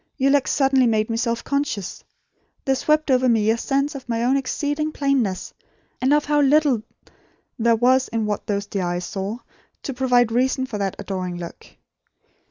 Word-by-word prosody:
your 275 0 +3
look 285 -1 +3
suddenly 270 -2 +3
made 220 0 +1
me - - -1
self 230 0 -1
conscious. 280 -9 -3 0.6
There 270 - +3
swept 305 +2 +1
over 255 0 +3
me 220 -2 +3
a 225 - 0
sense 275 +4 0
of 265 -3 -9
my 230 0 0
own 255 +3 +3
exceeding 290 +3 -1
plainness, 270 -11 -1 0.5
and 260 +2 +2
of 295 0 +3
how 295 0 +2
little 285 -4 +3 0.8
there 230 0 +4
was 255 +3 +3
in 225 -1 -2
what 210 -1 -3
those 200 -1 -1
dear 200 -1 -3
eyes 175 0 -2
saw, 195 +4 -4 0.5
to 275 - -4
provide 245 -2 +2
reason, 260 +2 +1
for 220 -5 -6
that 195 -2 -2
adoring 185 -3 -4
look. 170 -1 -9
250 Hz, 180 wpm, -22 LUFS, 215-275 Hz, 0.8 s, there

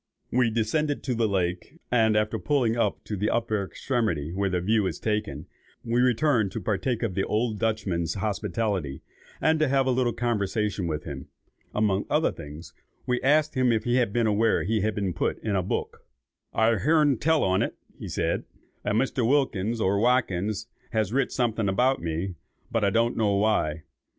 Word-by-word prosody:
We 125 -1 +3
descended 130 +7 0
to 130 - -1
the 115 -1 +1
lake, 90 - -2
and 110 -3 +3
after 105 +1 0
pulling 125 -6 +1
up 120 - 0
to 105 - -4
the 105 +3 0
upper 110 -3 0
extremity 95 - -2
where 100 +1 0
the 90 -1 0
view 105 +2 +2
is 85 - -4
taken, 105 -10 -2 0.4
we 120 +1 +2
returned 125 -4 +2
to - - -3
partake 110 +4 -1
of 110 -5 -1
the 95 +1 0
old 110 0 -1
Dutchman's 95 -7 -1
hospitality, 100 - -2 0.4
and 160 0 +2
have 135 -2 +3
a 130 - +2
little 125 -1 +1
conversation 105 -4 -1
with 75 -2 -3
him. - - -7 0.5
Among 105 -2 +1
other 155 +2 +2
things, 75 +1 -10 0.3
we 125 0 0
asked 150 +3 +3
him 130 -2 +2
if 110 -2 +1
he 120 +2 +2
was 120 -1 +1
aware 110 +1 +2
that 95 - -4
he 110 - +2
had 110 0 0
been 100 -3 -1
put - - -1
in 105 -3 -1
a 95 - +2
book. 90 - -4 0.5
"I've 110 -1 +2
hearn 150 -4 +3
tell 160 0 +2
on't," 95 0 +2 0.5
said - - -1 0.4
he; - - -1
"a - - +1
Mr. 125 +1 +1
Wilkins, 115 -6 +1
or 100 -1 +2
Watkins, 110 -3 +1 0.3
has 110 -1 0
writ 135 +1 +1
something 115 -4 0
about 125 +7 +2
me, 85 +3 -3 0.4
but 115 -2 0
I 100 - +4
don't 115 +4 +1
know 105 -3 +2
why. 100 -7 +1
110 Hz, 180 wpm, -26 LUFS, 95-125 Hz, 0.5 s, I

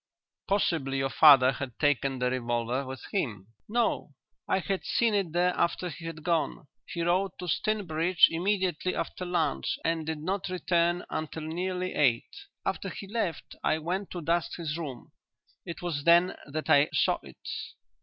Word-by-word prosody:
"Possibly 160 -9 +1
your 135 0 0
father 135 -4 +8
had 135 -3 -6
taken 140 -2 +1
the 125 0 0
revolver 120 +1 -1
with 130 0 -7
him." 110 - -2 0.2
"No. 235 +1 0 0.3
I - - +2
had 190 0 -2
seen 230 -2 +2
it 195 -5 0
there 180 +2 +2
after 180 +1 0
he 165 - -9
had 165 -2 -6
gone. 165 -3 -1 0.2
He 170 - -3
rode 185 +2 +1
to 180 - -6
Stinbridge 175 -2 +3
immediately 185 0 0
after 180 - -4
lunch 120 - 0
and 165 -1 +1
did 160 0 -3
not 185 +5 -2
return 175 -1 +1
until 155 0 -4
nearly 180 +3 -2
eight. 125 -6 +1 0.3
After - - -2
he - - -7
left 195 -7 -3
I 155 - +2
went 180 +5 -3
to 175 -2 -6
dust 170 +2 0
his 160 -3 -3
room. 145 -7 -6 0.6
It 170 0 -6
was 155 -5 -2
then 170 +3 +5
that 155 +2 -4
I 145 +1 +5
saw - - +2
it. - - -14
165 Hz, 165 wpm, -29 LUFS, 145-180 Hz, 0.6 s, father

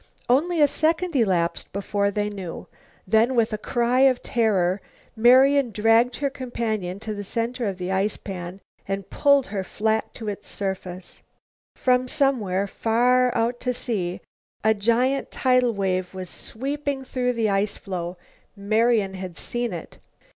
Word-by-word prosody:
Only 320 +7 +2
a 295 - +7
second 330 +3 0
elapsed 180 -8 +1
before 200 +1 -1
they 205 +1 -1
knew. 195 -5 -6 0.4
Then 225 +6 +3
with 230 -2 +2
a - - -1
cry 240 +3 +1
of 265 -2 +4
terror 195 -5 +1 0.3
Marian 260 +3 +5
dragged 225 +3 +3
her 280 -1 -1
companion 220 -8 -3
to 220 -1 -4
the 205 0 -5
center 235 +3 -2
of 195 -2 -3
the 180 0 -4
ice 195 +2 +1
pan 185 -1 -7 0.3
and 195 -1 -4
pulled 280 -2 +4
her 195 -2 -1
flat 220 +3 -1
to 225 - -7
its 205 -1 -5
surface. 185 -2 -5 0.5
From 255 0 +2
somewhere, 230 -10 +1
far 245 +4 +2
out 235 +2 0
to 250 -1 -1
sea, 190 -8 -3 0.4
a 220 +1 +4
giant 235 +6 +1
tidal 255 -2 +2
wave 185 -1 -1
was 185 -1 -5
sweeping 280 +2 -3
through 250 -1 -1
the 225 -3 0
ice 200 +1 0
floe. 180 -2 -5 0.4
Marian 215 0 +2
had 185 -2 -7
seen 240 -1 -2
it. 170 -3 -8
220 Hz, 150 wpm, -24 LUFS, 195-250 Hz, 0.5 s, a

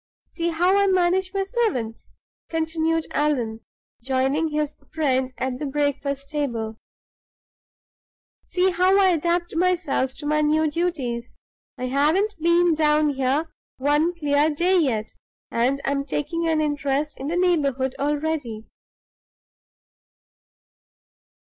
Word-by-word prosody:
See 340 0 -3
how 350 +3 +2
I 400 - +3
manage 370 0 +2
my 390 0 0
servants!" 385 - -2 0.4
continued 325 0 0
Allan, 250 -7 0 0.4
joining 265 +5 +1
his 300 -1 -2 0.2
friend 265 -5 0
at 255 0 -3
the 295 - -3
breakfast 280 0 -2
table. 230 -7 -3 1.7
"See 370 +1 +1
how 365 +2 +3
I 385 -1 +5
adapt 345 +1 0
myself 330 -7 0
to 295 - -9
my 305 +1 +2
new 305 +1 +2
duties! 270 -9 -2 0.4
I 255 - -3
haven't 305 +11 +2
been 340 +1 +4
down 305 -1 +3
here 280 +3 -1 0.2
one 295 +6 +1
clear 295 -1 +2
day 355 +5 +2
yet, 225 -9 -1 0.4
and 250 +4 +1
I'm 275 0 0
taking 305 +4 -2
an 320 -1 +2
interest 290 0 -1
in 270 - -4
the 340 +3 -1
neighborhood 280 -8 +1
already." 285 -6 -2
300 Hz, 115 wpm, -23 LUFS, 270-340 Hz, 1.7 s, I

